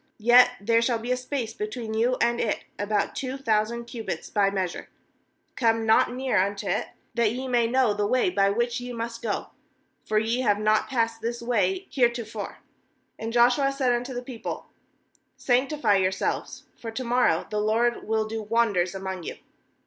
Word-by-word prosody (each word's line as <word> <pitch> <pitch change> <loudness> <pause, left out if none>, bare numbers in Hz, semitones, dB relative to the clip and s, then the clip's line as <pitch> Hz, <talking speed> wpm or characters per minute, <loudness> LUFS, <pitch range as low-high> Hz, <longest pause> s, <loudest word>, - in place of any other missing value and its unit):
4Yet 245 +3 +7
there 230 +3 +2
snail 235 0 +1
be 235 +2 -4
a - - +3
space 250 -3 -4
between 220 0 -5
you 240 +3 +1
and 235 0 +2
it, 215 - -1 0.2
about 205 +1 0
two 260 0 -3
thousand 230 -1 0
cubits 230 -2 -6
by 200 -2 +3
measure; 190 -3 -3 0.7
come 225 -2 +2
not 220 +2 +4
near 250 -6 +1
unto 200 +1 -4
it, - - -1 0.3
that 235 -2 +2
ye 260 +2 -4
may 240 -2 +2
know 250 -2 +3
the 205 0 0
way 255 - +2
by 195 - +3
which 235 +4 0
ye 245 0 -6
must 230 0 -5
go; 220 -4 -3 0.5
for 215 - -1
ye 225 +3 +1
have 205 -5 +2
not 215 +1 +2
passed 230 -3 0
this 235 +1 -3
way 245 - 0
heretofore.' 235 -5 -1 0.6
5And 225 +1 -3
Joshua 245 +4 +4
said 270 -2 +1
unto 245 +2 -3
the 245 - -4
people: 245 -3 -6 0.7
'Sanctify 250 -4 +2
yourselves; 190 0 -1
for 230 - -7
to 225 +3 -4
morrow 245 -8 +2
the 210 0 0
LORD 230 +3 +1
will 220 0 0
do 220 0 -4
wonders 210 -5 +1
among 190 -1 -4
you.' - - -6
230 Hz, 175 wpm, -26 LUFS, 215-245 Hz, 0.7 s, 4Yet